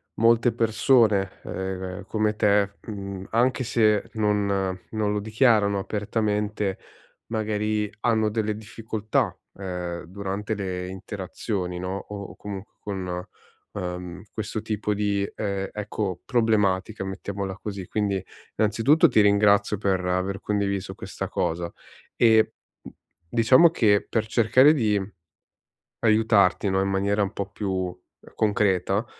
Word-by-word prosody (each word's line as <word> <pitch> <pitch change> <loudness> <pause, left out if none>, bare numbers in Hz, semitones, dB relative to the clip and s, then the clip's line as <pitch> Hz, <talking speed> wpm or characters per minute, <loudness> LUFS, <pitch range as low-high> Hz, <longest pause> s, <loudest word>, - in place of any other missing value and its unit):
molte 115 +1 +4
persone 110 -3 +2
ehm, 95 -1 -5
come 110 -1 0
te, 100 -1 +2
mhmm, 100 -2 -6
anche 125 +3 +2
se 110 -4 +2
non 105 -2 +1 0.5
non 110 -2 0
lo 105 - 0
dichiarano 110 -2 +3
apertamente, 105 -1 -1 0.5
magari 105 -1 -1
hanno 110 -3 +2
delle 110 -1 -1
difficoltà, 110 0 -2 0.2
ehm, 90 -2 -4
durante 100 +3 -4
le 90 -2 -4
interazioni 95 -1 -4
no, 90 +1 -3
o 100 0 -8
comunque 100 0 -8
con 90 -3 -4 0.5
ehm, 90 +1 -5
questo 110 0 -3
tipo 105 -1 -2
di, 100 -1 0
ehm, 100 -2 -2
ecco 105 -3 -3
problematica, 105 -4 +1
mettiamola 95 0 -4
così. 100 -3 -5
Quindi 100 -3 -1 0.3
innanzitutto 115 +10 +4
ti 120 - +3
ringrazio 100 0 +4
per 95 -2 0
aver 90 +2 -1
condiviso 100 -2 -1
questa - - -5
cosa. 85 +1 -2 0.4
E 110 -2 +5 0.8
diciamo 130 +9 +7
che 105 -10 +3
per 110 -1 -1
cercare 125 +6 +5
di 110 -7 +2 1.0
aiutarti 110 -4 +3
no, 95 0 +2
in 95 - 0
maniera 100 +2 +1
un 100 +1 -1
po' 100 0 -4
più 95 -3 -3 0.4
concreta, 100 0 +1
105 Hz, 115 wpm, -25 LUFS, 95-110 Hz, 1.0 s, diciamo